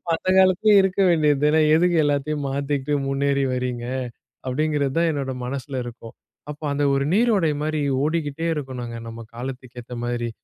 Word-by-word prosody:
அந்த 185 +3 -4
காலத்திலே 190 +3 +4
இருக்க 190 0 -1
வேண்டியது 150 -4 +3
தானே! 155 +1 +4
எதுக்கு 175 +2 +3
எல்லாத்தையும் 145 0 -1
மாத்திக்கிட்டு 140 +1 -2
முன்னேறி 140 0 +1
வர்றீங்க? 125 -1 -3 0.6
அப்டிங்கிறதான் 150 +3 0
என்னோட 135 -3 -3
மனசில 135 +1 -5
இருக்கும். 115 -1 -10 0.4
அப்போ 150 +1 -11
அந்த 145 - 0
ஒரு 140 0 +1
நீரோடை 205 -7 +3
மாரி 155 0 -1 0.2
ஓடிக்கிட்டே 155 0 -2
இருக்கணுங்க. 125 -5 -5
நம்ம 115 0 -8 0.2
காலத்துக்கு 125 0 -7
ஏத்த 125 - -11
மாரி. 120 -1 -2
140 Hz, 145 wpm, -23 LUFS, 130-155 Hz, 0.6 s, காலத்திலே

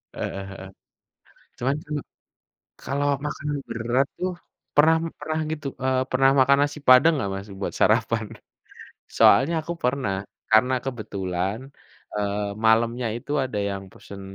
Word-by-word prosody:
Heeh 100 - -4
heeh, 95 -1 -9 0.9
cuman 135 +3 0
kan, 150 0 -4 0.9
kalau 140 +1 -1 0.2
makan 150 0 -5 0.2
berat 120 +4 0
tuh, 185 0 -1 0.4
pernah 160 +2 +6 0.2
pernah 155 +1 -2
gitu, 150 -2 -5 0.2
eee, 130 0 +2
pernah 135 +1 +4
makan 140 +1 +5
nasi 145 +1 -4
padang 130 +6 +7
gak 100 - -2
Mas 100 +2 -7
buat - - -2
sarapan? 115 0 +2 0.9
Soalnya 160 +6 +5
aku 170 +2 -4
pernah 125 -6 0 0.4
karena 125 +4 +5
kebetulan, 100 -4 -3 0.6
eee, 105 0 -1 0.2
malamnya 115 +2 +3
itu 130 - -8
ada 130 -5 -4
yang 100 -1 -5
pesen 100 -1 -11
125 Hz, 130 wpm, -24 LUFS, 105-140 Hz, 0.9 s, padang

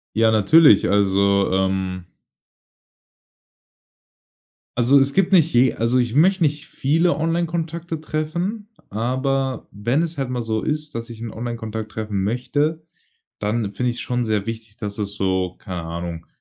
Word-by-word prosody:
Ja 115 0 +4
natürlich, 110 +3 +6
also, 100 0 +3
ähm 95 -1 -1 2.7
Also 125 +3 +5
es 135 0 +3
gibt 195 +3 +2
nicht 165 -3 +5
je 125 0 +4
also 115 +3 +1
ich 120 -2 0
möchte 185 +5 +4
nicht 150 0 -1
viele 165 +7 +1
Onlinekontakte 165 0 -2
treffen, 170 +8 -3 0.2
aber 130 +3 -1
wenn 120 +10 0
es 165 -2 -4
halt 135 -2 -2
mal 125 - -2
so 110 -1 -2
ist, 150 0 -3
dass 115 +1 -5
ich 115 - -9
'n 115 -1 -6
Onlinekontakt 110 -2 -5
treffen 105 -3 -3
möchte, 145 +9 -1 0.6
dann 105 -1 -1
finde 125 +4 -1
ich's 120 - -4
schon 125 -1 -1
sehr 105 -3 -1
wichtig, 110 -2 -7
dass 100 -1 -5
das 100 -2 -3
so, 95 -2 -1
keine 90 -3 -6
Ahnung, 85 0 -6
120 Hz, 145 wpm, -21 LUFS, 105-150 Hz, 2.7 s, natürlich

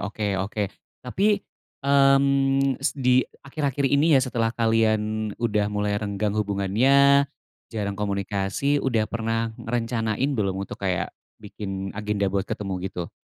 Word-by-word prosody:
oke 105 +1 -5 0.2
oke, 105 +2 -2 0.4
tapi, 200 +10 +1 0.4
mmm, 135 -1 +3
s 140 - +1
di 125 -1 +4 0.2
akhir-akhir 140 -1 -2
ini 145 +3 +4
ya - - +5
setelah 115 -3 0
kalian 110 -2 +1
udah 105 -3 0
mulai 105 0 -1
renggang 105 0 -2
hubungannya, 120 +8 +3 0.4
jarang 100 -3 -3
komunikasi, 100 +7 0
udah 115 -5 +1
pernah 115 0 -1
ngerencanain 115 +1 -1
belum 100 -3 0
untuk - - -10
kayak 95 -2 -1 0.2
bikin 95 -2 -6
agenda 105 -2 -1
buat 100 0 -1
ketemu 100 -2 -4 0.2
gitu? 90 -3 -6
110 Hz, 125 wpm, -24 LUFS, 105-135 Hz, 0.4 s, ya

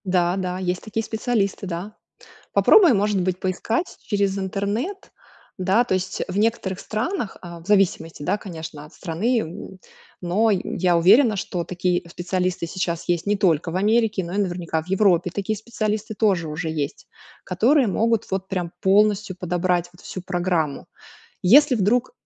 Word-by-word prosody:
Да-да, 180 0 0
есть 180 -1 -2
такие 225 +1 -3
специалисты, 220 -3 -1
да. 180 +5 -5 0.6
Попробуй, 360 - +6
может 205 -1 +1
быть, 180 0 -1
поискать 220 - -2
через 200 -2 0
интернет, 205 - -3 0.5
да. 190 +6 +3
То 245 - -2
есть- 185 0 -2
в 185 - -4
некоторых 210 -4 0
странах, 230 - -3
а, 170 -1 -9
в 165 - -16
зависимости, 180 -6 +1
да, 205 - 0
конечно, 160 -6 -8
от 155 - -17
страны. 190 +1 -2 0.4
Но 190 +6 +2
й 190 -3 +1
я 180 -2 +1
уверена, 215 +7 +5
что 180 -2 -3
такие 180 0 -1
специалисты 180 0 -2
сейчас 170 -1 -3
есть 175 +1 0
не 205 0 +2
только 170 -4 +2
в - - -5
Америке, 210 0 +2
но 170 +1 -6
и - - -2
наверняка 175 -4 -1
в 160 - -15
Европе 185 -3 +3
такие 205 +2 -2
специалисты 215 -1 -3
тоже 195 -7 +1
уже 160 +2 -4
есть, 150 -3 -4 0.4
которые 235 +9 +3
могут 225 +2 +1
вот 190 0 -2
прям 180 -3 -3
полностью 200 0 +3
подобрать 180 0 0
вот 180 - -18
всю 185 - -7
программу. 175 -5 -1 0.5
Если 275 +9 +6
вдруг, 235 - +1
190 Hz, 155 wpm, -23 LUFS, 175-215 Hz, 0.6 s, Попробуй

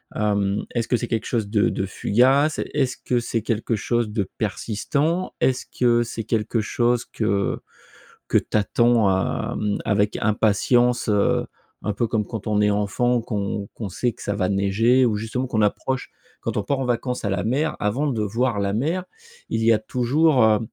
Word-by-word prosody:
hem, 100 -1 0
est-ce 115 -2 0
que 125 - +3
c'est 120 - -4
quelque 115 -2 -2
chose 110 -4 -1
de 105 0 +2
de 95 - -2
fugace? 130 +10 +2
Est-ce 135 -3 0
que 125 - 0
c'est 115 -1 -2
quelque 115 +1 -1
chose 120 +1 0
de 105 -3 -2
persistant? 140 - -1
Est-ce 130 -1 +1
que, 120 -1 +2
c'est 115 -1 -5
quelque 115 0 0
chose 120 +2 0
que 100 -3 -1 0.7
que - - +3
tu - - -2
attends, 115 0 +3 0.5
hem, 105 -1 -1
avec 105 0 +1
impatience? 115 +3 +2
Heu, 105 -2 +2 0.4
un 105 - 0
peu 115 +3 0
comme 105 -1 -1
quand 110 -1 -6
on 105 -1 +1
est 105 - +3
enfant, 115 +4 +1
qu'on 100 -2 -3
qu'on 110 - -5
sait 120 +7 -1
que - - -16
ça 105 - -2
va 95 -3 0
neiger, 105 +6 +3
ou 110 -3 +1
justement 115 +5 -3
qu'on 110 -3 0
approche 125 +5 -1 0.3
quand - - -3
on 105 - 0
part 135 +7 -1
en 135 - -1
vacances 125 +1 -2
à 100 - -1
la 95 -2 -1
mer, 140 +7 0
avant 120 +9 0
de 120 -6 -1
voir 115 +2 0
la 100 0 0
mer, 160 - -1 0.4
il 115 - -1
y 115 - +5
a 110 - +4
toujours, 125 +5 +2
heu, 110 -1 +4
115 Hz, 190 wpm, -23 LUFS, 105-125 Hz, 0.7 s, y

